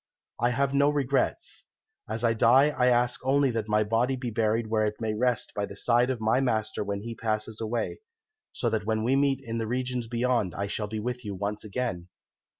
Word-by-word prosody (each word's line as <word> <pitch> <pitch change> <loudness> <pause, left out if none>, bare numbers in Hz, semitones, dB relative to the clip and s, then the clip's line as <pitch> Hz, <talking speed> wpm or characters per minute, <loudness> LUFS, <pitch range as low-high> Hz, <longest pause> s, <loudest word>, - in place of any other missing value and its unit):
I 120 - +3
have 135 +2 0
no 140 +1 +4
regrets. 140 -2 -1 0.4
As 110 +2 -3
I 115 -1 +3
die 125 +6 +5
I 125 -3 +1
ask 125 0 +2
only 135 0 +3
that 115 -2 -3
my 105 0 +3
body 115 +5 +1
be 125 -2 -4
buried 110 +1 +1
where 110 0 +1
it 105 0 -5
may 110 -2 -1
rest 120 +1 0
by 100 -1 -1
the 100 - -10
side 120 +4 +2
of 130 -3 -1
my 110 +3 +2
master 110 -5 0
when 100 0 -3
he 115 +2 -5
passes 110 -1 -3
away, 115 +1 -2 0.5
so 120 - -2
that 110 -2 -1
when 110 -1 0
we 125 +4 +2
meet 140 -1 +2
in 115 0 -4
the 110 - -2
regions 125 0 -2
beyond 120 -6 0
I 100 - -2
shall 105 +1 -3
be 110 +1 -4
with 125 +3 -4
you 100 -2 -5
once 105 +2 -3
again.' 105 -5 -3
115 Hz, 215 wpm, -27 LUFS, 110-125 Hz, 0.5 s, die